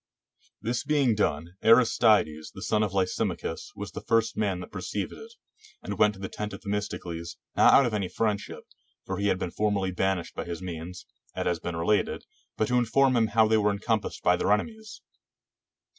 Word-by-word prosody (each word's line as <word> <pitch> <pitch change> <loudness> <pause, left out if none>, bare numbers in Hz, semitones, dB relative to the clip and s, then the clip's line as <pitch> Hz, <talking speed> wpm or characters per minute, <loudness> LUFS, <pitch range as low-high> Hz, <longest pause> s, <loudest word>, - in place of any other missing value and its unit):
This 115 +1 -1
being 145 -6 +2
done, 85 -4 -1
Aristides, 110 -9 +4
the 95 - -7
son 110 -1 +1
of 105 -3 0
Lysimachus, 95 -2 -2
was - - -6
the - - -7
first 115 0 +1
man 100 -4 0
that - - -10
perceived - - -4
it, 450 +1 -12 0.5
and - - -5
went 105 -1 +4
to - - -14
the 95 - -4
tent 105 +2 -5
of - - -8
Themistocles, 95 -5 -4 0.2
not - - +6
out 140 - +6
of 120 - -1
any 100 -4 -1
friendship, 105 -3 -2 0.4
for 95 0 -4
he 100 - +1
had 95 - +2
been 90 - -4
formerly 100 -2 0
banished 95 -1 -1
by - - -5
his 85 -1 -5
means, 90 -1 -7 0.3
as - - -2
has 85 -2 0
been 85 +1 -4
related, 85 +6 0 0.3
but 110 - +1
to 125 0 +3
inform 130 +2 +3
him 115 -2 +3
how 110 +1 +4
they 110 0 +3
were 105 -1 +3
encompassed 105 +1 -2
by 90 - +4
their 90 - 0
enemies. 220 - -2
105 Hz, 190 wpm, -27 LUFS, 90-115 Hz, 0.5 s, not